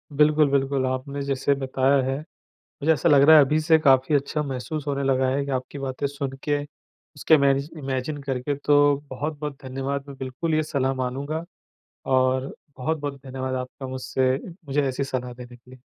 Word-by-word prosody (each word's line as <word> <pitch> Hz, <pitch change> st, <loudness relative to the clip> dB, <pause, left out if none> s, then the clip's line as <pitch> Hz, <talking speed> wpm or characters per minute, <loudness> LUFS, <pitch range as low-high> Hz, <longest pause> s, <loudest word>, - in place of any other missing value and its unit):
बिल्कुल, 150 Hz, 0 st, +4 dB
बिल्कुल 135 Hz, -1 st, +1 dB
आपने 130 Hz, +2 st, -3 dB
जैसे 140 Hz, 0 st, +1 dB
बताया 135 Hz, +1 st, +2 dB
है, 135 Hz, +1 st, -1 dB, 0.4 s
मुझे 160 Hz, +1 st, -1 dB
ऐसा 155 Hz, +1 st, +1 dB
लग 145 Hz, -3 st, +6 dB
रहा 160 Hz, +3 st, +8 dB
है 145 Hz, -, +7 dB
अभी 150 Hz, +3 st, +1 dB
से 160 Hz, 0 st, +4 dB
काफ़ी 135 Hz, -1 st, +4 dB
अच्छा 145 Hz, +2 st, 0 dB
महसूस 140 Hz, +2 st, -4 dB
होने 140 Hz, -1 st, -1 dB
लगा 130 Hz, -1 st, +2 dB
है। 140 Hz, +2 st, 0 dB
आपकी 130 Hz, +2 st, -4 dB
बातें 135 Hz, 0 st, -3 dB
सुन 140 Hz, -1 st, -4 dB
के, 145 Hz, -1 st, 0 dB
उसके 145 Hz, +1 st, -2 dB
इमेजि 140 Hz, -1 st, +3 dB
इमेजिन 135 Hz, +1 st, -3 dB
करके 135 Hz, +1 st, -2 dB
तो 145 Hz, +1 st, +2 dB, 0.3 s
बहुत-बहुत 145 Hz, +1 st, -4 dB
धन्यवाद। 135 Hz, +2 st, -4 dB
मैं 140 Hz, -, -9 dB
बिल्कुल 135 Hz, +5 st, -2 dB
ये 155 Hz, -, +2 dB
सलाह 135 Hz, -3 st, -1 dB
मानूँगा 140 Hz, +6 st, -3 dB, 0.6 s
और 130 Hz, +1 st, +1 dB, 0.2 s
बहुत-बहुत 145 Hz, 0 st, -3 dB
धन्यवाद 130 Hz, 0 st, -4 dB
आपका 130 Hz, +1 st, -5 dB
मुझसे 130 Hz, 0 st, 0 dB
मुझे 150 Hz, -5 st, -2 dB
ऐसी 135 Hz, +1 st, -2 dB
सलाह 125 Hz, -2 st, -4 dB
देने 120 Hz, 0 st, -11 dB
के 125 Hz, +1 st, -21 dB
लिए। 130 Hz, -1 st, -15 dB
140 Hz, 175 wpm, -24 LUFS, 130-145 Hz, 0.6 s, रहा